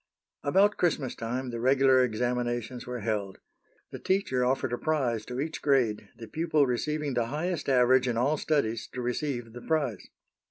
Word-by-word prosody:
About 195 +8 +3
Christmas 150 -7 0
time 125 +3 -4
the 115 - -4
regular 130 +1 +4
examinations 120 +1 -2
were 125 -1 -4
held. 100 -3 -2 0.5
The - - -7
teacher 185 -10 0
offered 130 -1 0
a - - 0
prize 125 -9 0
to 125 +1 -5
each 155 +3 -3
grade, 115 -8 +1
the 115 - -9
pupil 155 +2 +1
receiving 145 +3 -1
the 120 -2 0
highest 155 +3 -2
average 130 0 +4
in 120 -2 0
all 140 +6 +2
studies 140 -8 0
to 125 - -4
receive 120 -2 -3
the 120 - -9
prize. 140 - -1
125 Hz, 165 wpm, -28 LUFS, 120-145 Hz, 0.5 s, regular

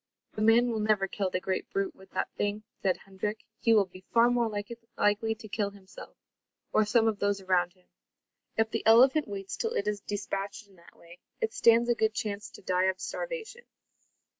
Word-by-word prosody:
"The 215 - -4
man 235 +2 +5
will 225 - -1
never 210 -2 +2
kill 195 0 -2
the 185 - -1
great 185 0 -3
brute 195 0 -1
with 190 0 -17
that - - -2
thing," 205 +1 -2 0.2
said 185 -2 +1
Hendrik. 200 +2 -4 0.2
"He 230 - +2
will 210 -3 +5
be 185 0 -15
far 235 +1 +5
more 240 -2 +1 0.5
likely 210 +2 +2
to 220 - -11
kill 205 -1 -1
himself, 195 -1 -13 0.6
or 215 - +4
some 225 +1 +3
of 215 -2 0
those 200 0 +1
around 180 -2 +1
him. 185 -1 -30 0.7
If 220 0 +2
the - - -2
elephant 260 +6 +6
waits 195 -1 -5
till 455 0 -1
it 200 - -1
is 210 -1 -1
despatched 200 0 -4
in 195 - -22
that 170 - -19
way, 170 +1 -16 0.2
it 450 -2 -1
stands 235 +1 +5
a 240 - +4
good 220 -1 0
chance 210 -3 -3
to - - -14
die 185 0 +1
of 190 0 0
starvation." 485 -1 -5
210 Hz, 200 wpm, -29 LUFS, 195-225 Hz, 0.7 s, elephant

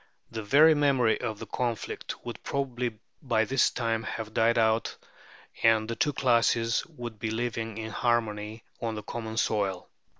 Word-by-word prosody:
The 115 -1 -4
very 150 +9 +6
memory 135 -6 +2
of 110 -3 -3
the - - -7
conflict 120 -3 -4
would - - -6
probably 125 -4 -2 0.2
by 115 -5 +1
this 135 +1 +3
time 115 -2 -1
have 110 -1 -5
died 115 +1 +3
out, 110 0 +2 0.6
and 110 -1 +4
the 115 - -3
two 145 - +1
classes 115 -2 +2
would 120 -9 -8
be 110 - -2
living 115 -1 -3
in 110 0 -5
harmony 110 -2 -1 0.2
on 115 -1 -2
the 105 - -6
common 110 +1 -5
soil. 100 -5 0
115 Hz, 160 wpm, -28 LUFS, 110-120 Hz, 0.6 s, very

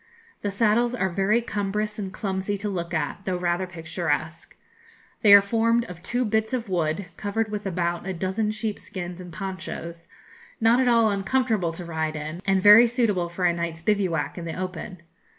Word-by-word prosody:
The 205 - -1
saddles 230 +4 +2
are 190 -6 0
very 200 +6 +2
cumbrous 210 0 -2
and 195 -2 -4
clumsy 195 0 -2
to 205 +1 -3
look 170 -3 -4
at, 155 -4 -2
though 185 -1 -1
rather 175 +1 -1
picturesque. 165 -2 -4 0.6
They 210 - +6
are 200 0 +11
formed 230 +3 +2
of 180 -1 -10
two 245 +6 -1
bits 220 +2 0
of 235 -3 -2
wood, 170 0 -1
covered 215 +1 -2
with 210 -1 -3
about 175 0 -2
a 190 - -2
dozen 190 +5 -1
sheepskins 195 -4 -5
and 180 -1 -10
ponchos; 170 -2 -6 0.5
not 230 +2 +4
at 260 - +2
all 230 -3 +4
uncomfortable 200 -2 0
to 175 +1 -7
ride 160 -1 -2
in, 155 +3 -5
and 190 -1 +2
very 210 +3 +9
suitable 220 -8 0
for 180 +1 -2
a 175 - +4
night's 170 -1 -4
bivouac 175 -8 0
in 170 - -6
the 165 +2 -5
open. 185 0 -6
190 Hz, 180 wpm, -25 LUFS, 170-215 Hz, 0.6 s, are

